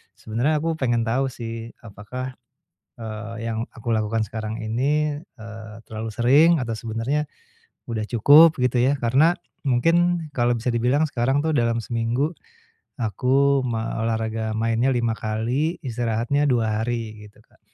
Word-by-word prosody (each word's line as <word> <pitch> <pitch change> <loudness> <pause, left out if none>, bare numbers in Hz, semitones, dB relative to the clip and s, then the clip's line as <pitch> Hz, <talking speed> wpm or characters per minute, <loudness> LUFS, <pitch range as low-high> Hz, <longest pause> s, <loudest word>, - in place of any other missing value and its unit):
sebenarnya 120 +8 -1
aku 165 -1 -1
pengen 120 -3 +1
tahu 125 +4 0
sih, 115 -2 -7
apakah, 115 +5 -7 0.7
eee, 110 0 -6
yang 115 0 -2
aku 115 0 -9
lakukan 110 +1 0
sekarang 110 -1 -5
ini, 145 +7 0 0.2
eee, 110 -1 -9
terlalu 110 0 -5
sering 135 +9 +5
atau 115 -3 -3
sebenarnya 115 +7 -2 0.6
udah 110 -2 -2
cukup, 145 +8 +6
gitu 125 0 +1
ya. 140 +2 +2
Karena, 135 +8 +4 0.3
mungkin 165 +5 +2
kalau 120 -1 +1
bisa 120 +2 -2
dibilang 125 +6 +2
sekarang 135 +2 +1
tuh 160 - +1
dalam 115 -3 +2
seminggu, 120 +7 -1 0.6
aku 135 +5 +2
ma 115 -3 -3
olahraga 110 -1 -2
mainnya 115 +2 +1
5 120 -3 +1
kali, 115 +10 -1
istirahatnya 120 +4 0
2 110 -4 +1
hari, 115 -1 -3
gitu 105 - -23
Kak. - - -30
120 Hz, 140 wpm, -23 LUFS, 115-135 Hz, 0.7 s, cukup